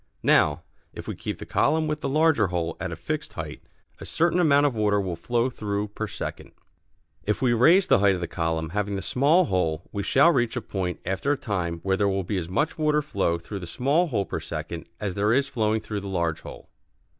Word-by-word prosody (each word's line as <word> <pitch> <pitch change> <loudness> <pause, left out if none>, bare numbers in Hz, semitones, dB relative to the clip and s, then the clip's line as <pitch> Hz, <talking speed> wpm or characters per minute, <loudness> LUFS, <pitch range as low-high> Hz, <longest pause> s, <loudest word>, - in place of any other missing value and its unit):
Now, - - +3 0.3
if - - -9
we - - -3
keep - - -5
the - - -8
column 155 +2 +2
with 150 0 -2
the 140 - -3
larger 155 -7 +3
hole 85 -2 -2
at - - -4
a - - -4
fixed - - -4
height - - -6 0.4
a - - -8
certain 170 +2 +1
amount 145 -4 +4
of 140 - +2
water 105 -2 +2
will 95 -3 -2
flow 120 +8 0
through 105 -4 -3
per 110 +1 -4
second. - - -6 0.7
If 105 - -1
we 125 -3 +2
raise 170 - +5
the - - +4
height 100 -1 +4
of - - -4
the 85 - -3
column 80 -1 -2
having 100 +2 -2
the 95 - -4
small 150 - +3
hole 85 - -1
we 100 - -3
shall 140 - +5
reach 120 -6 0
a 125 - -2
point 95 -4 -4
after 95 +10 -1
a - - -3
time 90 -9 -3
when 95 0 0
there 100 -1 +3
will 95 0 -1
be 95 +3 -2
as 85 -2 -4
much 150 - -1
water 150 -1 +2
flow 95 - 0
through 95 +4 -7
the 90 - -8
small 140 - +1
hole 105 -9 -1
per - - -4
second 85 0 -6
as 100 -3 -2
there 105 +3 +1
is 135 +2 +2
flowing 110 -3 0
through 105 -1 -4
the 100 - -7
large 85 -4 -1
hole. - - -11
105 Hz, 230 wpm, -25 LUFS, 95-140 Hz, 0.7 s, raise